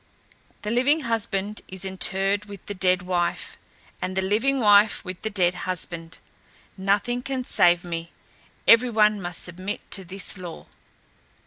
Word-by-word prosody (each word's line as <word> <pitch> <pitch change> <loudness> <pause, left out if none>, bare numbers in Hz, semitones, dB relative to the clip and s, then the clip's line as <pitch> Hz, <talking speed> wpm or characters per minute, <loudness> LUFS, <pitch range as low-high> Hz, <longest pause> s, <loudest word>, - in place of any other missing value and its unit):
The 210 - -2
living 270 +6 +3
husband 210 -4 -1
is 190 0 -4
interred 195 +2 0
with 200 -3 -11
the 205 - -4
dead 185 -1 +1
wife, 175 -1 -2 0.5
and 185 +1 -3
the 190 - +1
living 230 +8 +1
wife 205 -2 +5
with 185 -1 -7
the 220 - -2
dead 185 -4 +1 0.2
husband. 170 -2 -4 0.6
Nothing 205 +6 0
can 260 0 -3
save 175 -7 +4
me; 170 -1 -5 0.6
every 235 +2 +7
one 215 -2 +3
must 175 -1 -4
submit 185 +3 -5
to 195 - -1
this 190 +2 -2
law." 175 -3 -8
195 Hz, 145 wpm, -24 LUFS, 180-215 Hz, 0.6 s, every